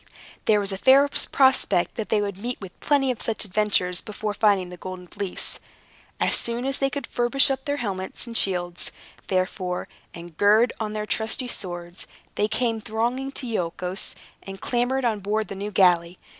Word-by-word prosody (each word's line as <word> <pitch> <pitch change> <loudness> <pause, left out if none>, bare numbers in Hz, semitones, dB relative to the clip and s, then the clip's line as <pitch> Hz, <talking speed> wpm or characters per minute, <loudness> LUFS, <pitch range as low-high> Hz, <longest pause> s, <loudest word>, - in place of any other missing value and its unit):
There 210 -1 +4
was 200 0 -1
a 190 - -4
fair 270 +4 +6
prospect 265 -9 +3
that 220 - -5
they 210 - +3
would 200 -2 -3
meet 240 +4 -4
with 190 -3 -10
plenty 275 -3 +2
of 245 - -5
such 220 -1 -1
adventures 190 -3 +1
before 210 0 -4
finding 200 -4 +2
the 180 - -9
Golden 185 0 -7
Fleece. 195 +1 -5 0.6
As - - +2
soon 235 +2 -2
as 270 0 -1
they 275 - +2
could 280 -2 -4
furbish 245 +4 +3
up 265 0 -3
their 285 0 -1
helmets 195 -5 -3
and 235 -1 -8
shields, 175 -4 +1 0.4
therefore, 185 -1 -1 0.2
and 170 -1 -10
gird 215 +4 +5
on 215 -1 -3
their 210 0 -2
trusty 220 +4 -1
swords, 175 -5 -5 0.3
they 210 - +1
came 225 0 0
thronging 240 +6 -1
to 270 - 0
Iolchos, 180 -3 -2 0.3
and 195 0 -9
clambered 250 +3 0
on 220 -3 +1
board 210 +1 -1
the - - -4
new 200 +2 -4
galley. 180 -3 +3
210 Hz, 180 wpm, -25 LUFS, 185-240 Hz, 0.6 s, fair